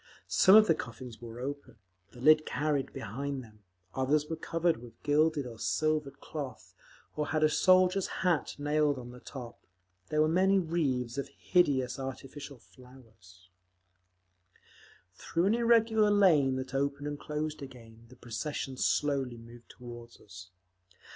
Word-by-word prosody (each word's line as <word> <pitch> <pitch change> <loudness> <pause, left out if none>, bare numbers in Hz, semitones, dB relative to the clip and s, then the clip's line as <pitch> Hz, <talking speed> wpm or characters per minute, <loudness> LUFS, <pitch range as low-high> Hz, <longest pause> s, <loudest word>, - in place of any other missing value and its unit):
Some 190 +1 +6
of 215 0 +9
the 165 - +4
coffins 120 -4 -8
were 115 0 -9
open, 140 +3 -6 0.3
the 125 - -15
lid 155 +2 +6
carried 145 -3 -1
behind 135 +3 -5
them; 110 -2 -17 0.3
others 145 +3 +1
were 160 - -4
covered 165 +1 0
with 120 0 -14
gilded 150 -1 +2
or 115 -2 -9
silvered 150 -3 -1
cloth, 145 -5 -7 0.4
or 150 -1 -2
had 155 0 0
a 155 - +5
soldier's 185 +3 +4
hat 175 -5 -1
nailed 145 0 +1
on 120 -1 -8
the 125 - -12
top. 125 -3 -9 0.5
There 150 - 0
were 155 - +4
many 190 +4 +3
wreaths 140 -8 -1
of 140 - -4
hideous 140 -8 +1
artificial 135 +1 -7
flowers…. 110 -8 -19 1.6
Through 165 - -1
an 200 - +3
irregular 230 -2 +3
lane 165 -10 +4
that 130 0 -5
opened 140 +1 -1
and 145 0 -5
closed 150 0 -4
again 115 -4 -12
the 130 - -15
procession 130 +3 -5
slowly 135 -5 0
moved 115 +1 -14
toward 120 -1 -11
us. 90 -2 -13
140 Hz, 145 wpm, -30 LUFS, 125-155 Hz, 1.6 s, of